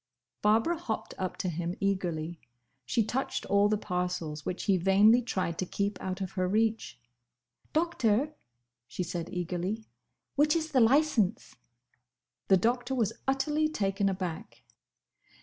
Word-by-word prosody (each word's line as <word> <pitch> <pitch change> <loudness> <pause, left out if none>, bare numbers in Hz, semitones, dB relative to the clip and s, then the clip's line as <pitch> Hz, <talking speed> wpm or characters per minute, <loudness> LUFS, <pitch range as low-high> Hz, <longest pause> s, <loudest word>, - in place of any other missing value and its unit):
Barbara 225 +11 +3
hopped 225 -10 -4
up 185 -1 -3
to - - -2
him 175 +1 -2
eagerly. 175 -5 -1 0.5
She 225 - +2
touched 255 +5 -2
all 200 +1 +3
the 215 - +2
parcels, 180 -5 -3
which 180 - -3
he 195 - +3
vainly 200 +6 +5
tried 185 -8 -2
to 185 - 0
keep 200 +1 -2
out 185 +1 -4
of 190 -1 -3
her 185 -2 -1
reach. 220 - 0 0.7
"Doctor," 300 -5 +1 0.5
she 180 - -3
said, 170 -1 -4
eagerly, 180 +5 -3 0.5
"which 300 +3 +4
is 320 -1 -1
the 265 - +4
licence?" 235 - +2 0.9
The 190 - +6
Doctor 245 +6 0
was 225 -4 +1
utterly 295 +3 +1
taken 195 -7 0
aback. 185 -4 -5
200 Hz, 135 wpm, -29 LUFS, 180-245 Hz, 0.9 s, The